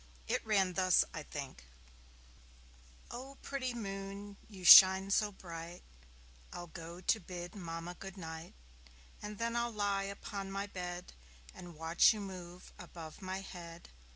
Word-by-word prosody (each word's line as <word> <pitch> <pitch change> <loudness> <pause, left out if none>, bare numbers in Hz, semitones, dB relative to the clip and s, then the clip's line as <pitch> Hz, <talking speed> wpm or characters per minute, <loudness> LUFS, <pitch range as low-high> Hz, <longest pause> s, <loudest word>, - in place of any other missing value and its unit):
It - - 0
ran 195 -4 +2
thus, 185 -1 +4
I 155 - -4
think: 140 - -7 1.5
O 265 +3 -8
pretty 255 -3 -3
Moon, 200 -1 -6
you 190 -4 -10
shine 190 +2 +10
so 210 +1 +2
bright! 170 -2 -9 0.7
I'll 175 - -6
go 170 +1 -9
to 220 +4 +2
bid 175 -1 -7
Mamma 165 -2 -6
good 195 +2 -10
night, 160 -1 -8 0.7
And 210 0 -6
then 230 +1 -1
I'll 235 0 +1
lie 200 -2 0
upon 200 0 -6
my 195 +1 -2
bed 180 -3 -6 0.4
And 175 -2 -11
watch 165 +5 +5
you 215 - -6
move 180 -3 -9
above 170 -1 -10
my 190 0 -4
head. 170 -3 -10
190 Hz, 140 wpm, -34 LUFS, 175-200 Hz, 1.5 s, shine